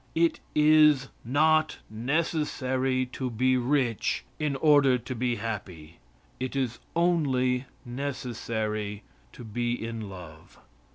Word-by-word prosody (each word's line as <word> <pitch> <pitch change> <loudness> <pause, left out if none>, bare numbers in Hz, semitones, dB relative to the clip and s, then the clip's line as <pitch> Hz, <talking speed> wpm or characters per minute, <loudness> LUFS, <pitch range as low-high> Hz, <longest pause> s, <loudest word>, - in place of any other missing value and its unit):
It 165 0 +2 0.2
is 150 -3 +5
not 155 +5 +3
necessary 130 0 0
to 130 -1 -3
be 130 +3 +2
rich 125 -3 0
in 150 -2 0
order 140 -3 +5
to 125 +2 -6
be 120 0 0
happy. 95 -8 -6 0.4
It 130 +1 -3
is 130 -4 -1 0.2
only 135 -7 +2 0.2
necessary 115 -5 -3 0.3
to 125 - -10
be 120 +2 -2
in 115 -3 -5
love. 85 -4 -12
130 Hz, 110 wpm, -27 LUFS, 115-145 Hz, 0.4 s, is